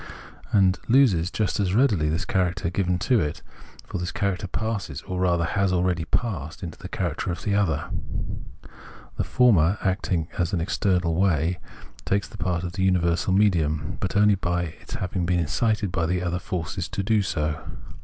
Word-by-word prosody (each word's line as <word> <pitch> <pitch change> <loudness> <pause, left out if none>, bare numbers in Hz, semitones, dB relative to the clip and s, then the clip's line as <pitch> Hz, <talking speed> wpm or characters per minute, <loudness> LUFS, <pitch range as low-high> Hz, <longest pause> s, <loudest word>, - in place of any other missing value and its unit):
And 95 -2 +4
it - - -24
loses 110 -10 +4
just 105 0 -1
as 95 -1 +1
readily 105 - +3
this 80 +4 -1
character 90 -2 0
given 90 -1 0
to 120 +6 +2
it, 75 -5 -2 0.4
for 95 - -5
this 90 0 -3
character 100 -1 -1
passes, 100 -8 -3
or 90 0 -4
rather 85 -2 +2
has 100 +2 +1
already 90 -2 +1
passed, 85 - -2
into 85 -3 -7
the - - -8
character - - -2
of 85 - -5
the 105 - 0
other. 100 -7 +1 1.3
The - - +1
former, 100 -7 +4
acting 90 -4 0
in 85 - +1
an 90 - +1
external 90 -1 +1
way, 85 -1 +1 0.4
takes 100 0 0
the - - -12
part 90 -2 -1
of 90 +2 -5
universal 90 -1 +2
medium, 80 -6 +2
but 100 - -3
only 105 0 +5
by 90 -2 0 0.2
its - - -7
having 90 -1 -2
been 90 0 +2
incited 105 +4 0
by 85 -3 0
the 90 +1 0
other 90 0 -1
force 85 -1 -4
to 100 - -3
do 110 +1 +3
so. 75 -4 -2
90 Hz, 175 wpm, -25 LUFS, 85-100 Hz, 1.3 s, only